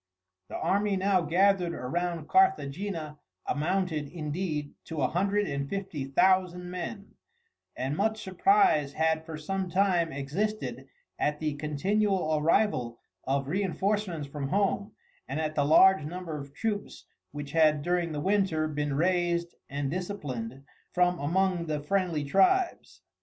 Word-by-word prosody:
The - - -5
army 200 +1 +1
now 190 -1 +2
gathered 180 +2 +2
around 170 +4 -3
Carthagena 185 - +1 0.3
amounted, 160 -1 -1
indeed, 155 -1 -3
to 160 -2 -5
a - - +4
hundred 200 +6 +1
and 140 -4 -3
fifty 190 -8 -4
thousand 180 +4 +2
men, 200 +3 -6 0.7
and 135 +3 -2
much 220 +4 0
surprise 190 - +3
had 160 0 0
for 160 -1 -5
some 190 +4 -3
time 180 -3 +2
existed 185 +11 -3 0.3
at 150 0 0
the 155 -2 -1
continual 165 +4 0
arrival 150 - +1 0.3
of 135 0 0
reinforcements 190 -1 -1
from 140 -1 -4
home, 200 +3 0 0.3
and 135 +4 -3
at 155 -1 -1
the 145 -2 +1
large 190 +3 +6
number 170 +1 -5
of 140 -1 -7
troops 205 +7 -4 0.3
which 145 -1 -6
had 155 -2 +3
during 175 -1 0
the 150 -1 -3
winter 190 -4 +1
been 145 -2 -2
raised 175 +1 +1 0.2
and 140 0 -2
disciplined 140 - -5 0.3
from 180 -1 +2
among 175 +3 +1
the 150 -1 -1
friendly 170 0 0
tribes. 335 - +1
170 Hz, 135 wpm, -28 LUFS, 150-195 Hz, 0.7 s, large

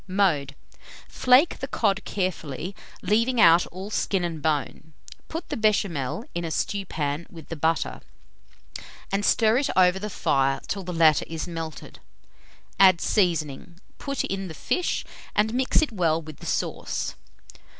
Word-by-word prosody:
Mode. 170 -8 +1 0.5
Flake 255 +6 +4
the 270 - -4
cod 210 -5 0
carefully, 180 -2 -3 0.3
leaving 230 +4 +2
out 170 -2 +6
all 190 +4 -8
skin 195 -3 0
and 165 -3 -3
bone; 155 +1 -2 0.3
put 330 +2 -6
the - - -2
béchamel 200 - 0
in 170 - -3
a 165 - -3
stewpan 160 -4 -2
with 165 -3 -12
the 165 - -4
butter, 160 +2 -1 1.1
and 195 +1 0
stir 220 +3 +4
it 280 - -1
over 185 0 +4
the 210 +2 -4
fire 135 -7 +1
till 200 - -3
the 180 -1 -6
latter 160 -3 +4
is 160 -1 -4
melted; 165 -3 -7 0.8
add 185 -3 +7
seasoning, 170 -3 0 0.2
put 275 -2 -2
in 195 0 -3
the 160 - -8
fish, 145 - -1 0.3
and 215 +2 +2
mix 260 +5 +2
it 300 - -2
well 165 -6 +1
with 155 -2 -10
the - - -9
sauce. - - -2
180 Hz, 150 wpm, -25 LUFS, 160-210 Hz, 1.1 s, add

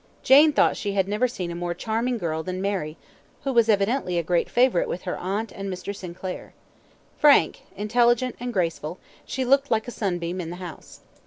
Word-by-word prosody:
Jane 295 +4 +7
thought 285 - +3
she 200 -2 -3
had 195 -1 +1
never 210 +5 +1
seen 185 -8 -5
a - - -5
more 175 0 -3
charming 230 +5 -1
girl 160 -5 -2
than 185 +2 -4
Mary, 185 -6 -2 0.5
who 275 - -1
was 230 -2 +4
evidently 200 -2 +1
a 170 - +1
great 170 +1 0
favourite 245 -7 +3
with 180 - -4
her - - -3
aunt 200 +4 -3
and 195 0 -5
Mr. 185 +2 -5
Sinclair. 185 0 -7 0.6
Frank, 285 - +5
intelligent, 240 +4 +2
and 245 0 -4
graceful, 170 -4 -2 0.3
she 260 -1 -3
looked 275 +2 +3
like 220 0 0
a - - -4
sunbeam 180 -4 -2
in 165 - -6
the 175 - -6
house. 180 -2 -10
200 Hz, 190 wpm, -24 LUFS, 175-240 Hz, 0.6 s, Jane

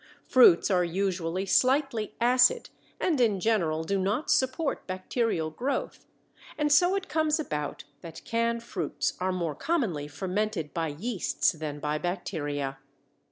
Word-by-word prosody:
Fruits 210 -7 +5
are 180 -1 +3
usually 185 0 -1
slightly 255 0 +1
acid 250 - +3 0.3
and 310 -8 +1
in 210 -5 +2
general 175 -7 +1
do 195 +4 -1
not 205 +10 0
support 260 +3 0
bacterial 185 -3 -1
growth, 255 - -3 0.5
and 295 -1 +1
so 355 +6 +5
it 390 -2 -3
comes 315 0 +1
about 150 - -4 0.2
that 165 -2 -10
canned 230 0 0
fruits 180 -9 -2
are 185 +1 0
more 170 -4 -2
commonly 190 - -1
fermented 185 -1 -3
by 165 -1 -1
yeasts 185 +8 -1
than 150 -2 -6
by 150 +1 -2
bacteria. 145 -6 -3
195 Hz, 135 wpm, -28 LUFS, 165-250 Hz, 0.5 s, Fruits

